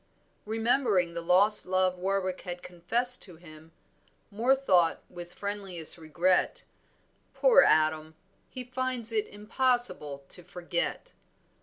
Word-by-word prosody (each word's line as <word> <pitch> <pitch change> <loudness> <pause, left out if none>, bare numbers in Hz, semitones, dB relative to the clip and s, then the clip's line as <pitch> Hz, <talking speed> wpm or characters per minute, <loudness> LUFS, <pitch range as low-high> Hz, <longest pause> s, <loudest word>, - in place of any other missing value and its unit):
Remembering 220 -5 0
the 170 - -5
lost 195 +5 +3
love 185 -1 0
Warwick 185 0 -2
had 175 0 -8
confessed 230 +9 0
to 180 -5 -9
him, 160 -1 -16 0.6
Moor 235 +6 +2
thought 185 -11 +1
with 175 0 -10
friendliest 195 -5 -2
regret 175 +3 0 0.7
"Poor - - +5
Adam, 155 - +1 0.3
he 255 - -7
finds 255 -2 +1
it 215 -2 -1
impossible 210 - -2
to - - -3
forget." 175 - -5
185 Hz, 115 wpm, -28 LUFS, 170-230 Hz, 0.7 s, Poor